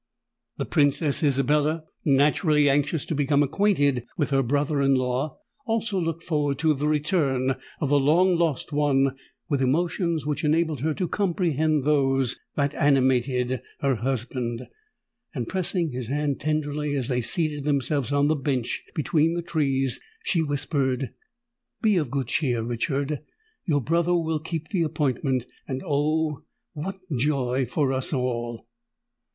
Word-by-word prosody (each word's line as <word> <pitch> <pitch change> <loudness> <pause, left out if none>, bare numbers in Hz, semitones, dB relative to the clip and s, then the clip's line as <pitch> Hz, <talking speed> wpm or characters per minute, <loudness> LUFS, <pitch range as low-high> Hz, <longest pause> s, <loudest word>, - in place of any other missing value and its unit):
The - - -2
Princess 145 +1 +2
Isabella, 150 +2 +2 0.2
naturally 150 +2 +3
anxious 145 +2 +1
to - - -3
become 145 0 +2
acquainted 145 - +1
with 145 -3 0
her 135 0 +3
brother 145 +3 0
in 135 0 +4
law, 130 +3 -1 0.3
also 225 -3 0
looked 165 -1 -2
forward 150 -4 0
to 155 +2 +3
the 145 +1 -1
return 145 -4 +1 0.3
of 145 - -1
the 145 0 +4
long 175 +6 +4
lost 165 -4 0
one 135 -2 +2 0.3
with 140 -5 0
emotions 165 +3 0
which 150 -1 -2
enabled 155 -1 +1
her 155 +3 -1
to 180 - -1
comprehend 160 -6 +1
those 135 -3 +2 0.2
that 140 0 +1
animated 130 -3 +2 0.2
her 135 -3 +2
husband; 120 0 -3 0.7
and 120 -4 -3
pressing 180 -3 -1
his 125 -2 -4
hand 145 +1 -1
tenderly 150 -1 -1
as 130 -4 -1
they 125 -1 0
seated 150 +3 -1
themselves 140 -1 0
on 145 0 +3
the 155 - +2
bench 130 -4 -2
between 160 +1 +2
the 175 - -2
trees, 135 -5 0 0.2
she 170 - +1
whispered, 140 -4 -1 0.7
"Be 215 -2 +4
of 150 -7 0
good 135 0 -1
cheer, 120 -2 0
Richard: 135 +5 -1 0.5
your 145 -5 +2
brother 170 +6 +1
will 160 -2 0
keep 160 0 -5
the 190 -5 0
appointment—and 135 -4 -2
oh! 155 0 0 0.3
what 180 +6 -5 0.2
joy 130 -2 +1
for 135 +2 0
us 130 0 -2
all!" 120 -4 -2
145 Hz, 145 wpm, -25 LUFS, 135-155 Hz, 0.7 s, in